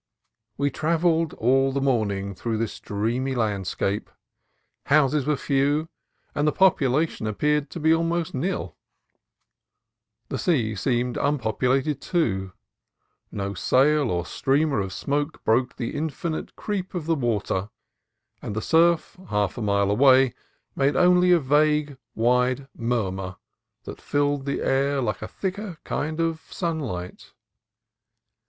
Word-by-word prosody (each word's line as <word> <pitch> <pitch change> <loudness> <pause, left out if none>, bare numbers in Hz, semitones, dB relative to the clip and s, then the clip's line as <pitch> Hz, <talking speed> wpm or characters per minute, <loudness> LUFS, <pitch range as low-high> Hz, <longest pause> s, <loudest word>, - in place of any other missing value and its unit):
We 140 0 +1
travelled 165 +1 +1
all 135 +3 +2
the 140 - -1
morning 105 -7 0
through 115 +4 -3
this 115 -1 -3
dreamy 120 +6 -2
landscape. 100 -2 -1 0.8
Houses 145 -1 +3
were 150 - +3
few, 145 +4 +1 0.4
and 150 +1 +1
population 155 - +2
ap 105 - -4
peared 150 -1 +1
to - - -7
be 160 +1 +4
almost 165 0 0
nil. 175 +9 -3 1.5
The - - -3
sea 130 - +1
seemed 120 +4 -1
unpopu 135 -7 -1 0.2
lated, 150 -2 -2
too; 95 - -1 0.8
no 100 -1 -3
sail 140 +7 +3
or 85 -1 -1
streamer 140 - +1
of 95 -1 -3
smoke 145 - -2
broke 125 +3 +1
the 120 -3 -4
infinite 160 +2 -4
creep 195 -3 -4
of 170 -4 -3
the 165 - +2
water, 105 - -1 0.7
and 105 - -5
the 110 - -1
surf, 170 +2 +2
half 105 -2 0
a - - -5
mile 100 -1 +1
away, 130 +2 +5 0.4
made 135 0 +2
only 180 +1 +5
a 175 - +7
vague, 150 +1 +2 0.2
wide 125 +3 +1
murmur, 95 -6 -2 0.5
that - - -9
filled 145 -1 0
the 140 - -1
air 140 +1 +1
like 110 -5 -2
a - - -4
thicker 195 -2 -5
kind 155 +2 -3
of 165 -1 0
sunlight. 135 - -4
135 Hz, 130 wpm, -24 LUFS, 110-155 Hz, 1.5 s, a